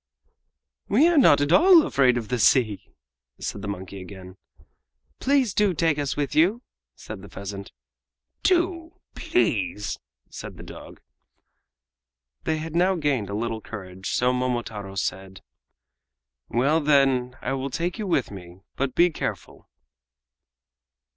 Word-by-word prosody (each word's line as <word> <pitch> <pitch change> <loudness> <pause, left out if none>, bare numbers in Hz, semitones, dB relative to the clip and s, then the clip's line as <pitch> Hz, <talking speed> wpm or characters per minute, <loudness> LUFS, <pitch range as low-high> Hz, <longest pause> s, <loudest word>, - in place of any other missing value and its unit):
"We 315 - +4
are 345 -2 +2
not 145 - +6
at 145 +2 0
all 340 - +7
afraid 130 -3 +3
of 115 -3 -5
the 125 - -1
sea," 110 -3 +2 0.5
said 100 - -5
the 105 - -6
monkey 95 -1 -6
again. 95 0 -11 0.8
"Please 265 -6 +2
do 205 -4 +2
take 160 -2 +1
us 140 -1 -2
with 145 -2 -2
you," 195 +10 +2 0.3
said 105 -3 -9
the 100 - -12
pheasant. 100 +2 -8 0.7
"Do 345 -2 0
please," 105 - -1 0.3
said - - -9
the - - -10
dog. - - -12 1.4
They 160 - 0
had 160 +1 -6
now 185 +2 +3
gained 145 - -1
a 100 - -4
little 115 0 -3
courage, 95 -4 -8
so 125 +1 +1
Momotaro 115 -6 -3
said: 95 0 -4 1.1
"Well, 140 +7 +2
then, 135 -3 +2
I - - -3
will 135 0 -3
take 170 - -3
you 210 - -3
with 140 - 0
me, 90 -2 -11
but 135 -1 -2
be 175 0 +4
careful!" - - -6
130 Hz, 135 wpm, -24 LUFS, 100-170 Hz, 1.4 s, all